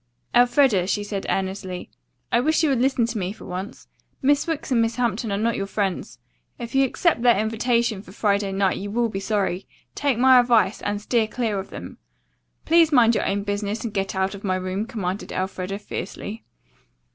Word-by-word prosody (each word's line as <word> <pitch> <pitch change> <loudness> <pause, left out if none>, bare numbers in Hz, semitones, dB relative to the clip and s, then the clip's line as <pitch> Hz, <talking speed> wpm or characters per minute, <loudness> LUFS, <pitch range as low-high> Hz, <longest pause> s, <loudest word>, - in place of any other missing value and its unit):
"Elfreda," 245 -6 +4
she 205 +1 0
said 200 -1 -4
earnestly, 190 -1 -3 0.4
"I 235 - +4
wish 315 +5 +2
you 310 - +3
would 260 -3 +1
listen 260 -2 +2
to 230 -1 -3
me 185 0 -2
for 215 - -11
once. 185 +3 -7 0.3
Miss 285 +3 +2
Wicks 325 -4 -3
and 235 -2 +4
Miss 225 0 0
Hampton 235 -2 -1
are 200 - 0
not 230 +2 0
your 195 - -3
friends. 195 -2 -2 0.4
If 235 -1 -7
you 270 0 +4
accept 300 +1 +1
their 240 -3 +5
invitation 225 0 0
for 190 - -14
Friday 200 -1 0
night 195 -1 +1
you 200 +2 -5
will 235 +2 0
be 195 - -4
sorry. 195 -2 -1 0.3
Take 280 -5 0
my 260 +1 +7
advice, 235 -4 +3
and 205 0 -2
steer 220 +1 +1
clear 220 -3 -2
of 190 - -7
them." - - -9 0.7
"Please 330 -1 +5
mind 240 -4 +5
your - - 0
own 200 +1 -1
business 205 +1 -2
and 230 -3 -4
get 195 -1 -2
out 190 +1 0
of 200 - -9
my 185 -2 0
room," 185 +3 -3
commanded 195 -4 -4
Elfreda 190 +1 -3
fiercely. 205 +1 -6
215 Hz, 195 wpm, -23 LUFS, 195-240 Hz, 0.7 s, my